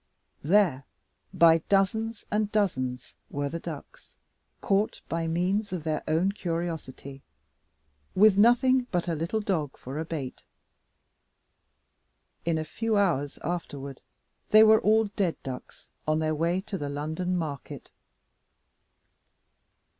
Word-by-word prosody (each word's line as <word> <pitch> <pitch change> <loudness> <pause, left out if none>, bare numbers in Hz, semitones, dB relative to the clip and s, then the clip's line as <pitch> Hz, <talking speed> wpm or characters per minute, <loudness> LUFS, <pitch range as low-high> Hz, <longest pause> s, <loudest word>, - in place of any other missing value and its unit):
There, 160 -6 +3 0.5
by 165 -1 +6
dozens 220 +3 +1
and 210 0 0
dozens, 130 - -1 0.2
were 145 0 -2
the 165 - -4
ducks, - - -10 0.4
caught 200 +2 0
by 165 0 -2
means 185 +6 0
of 180 -4 -4
their 155 -1 -1
own 165 +5 +2
curiosity 165 -7 -5 0.9
with 210 +1 +6
nothing 245 +4 +4
but 175 -1 -1
a 170 - 0
little 165 +8 -2
dog 160 -9 -2
for 135 +4 -6
a - - -1
bait! 145 -6 -5 2.0
In 165 -1 +1
a 155 - -2
few 220 +7 -1
hours 150 -8 +1
afterward 140 -6 -5 0.5
they 215 +1 +8
were 220 0 +6
all 220 +1 +4
dead 195 -4 -1
ducks 130 -2 -9 0.2
on 155 0 +2
their 155 0 0
way 170 +4 0
to 195 -1 -5
the 145 - -3
London 160 +6 -2
market. 150 -5 -6
170 Hz, 125 wpm, -27 LUFS, 155-205 Hz, 2.0 s, they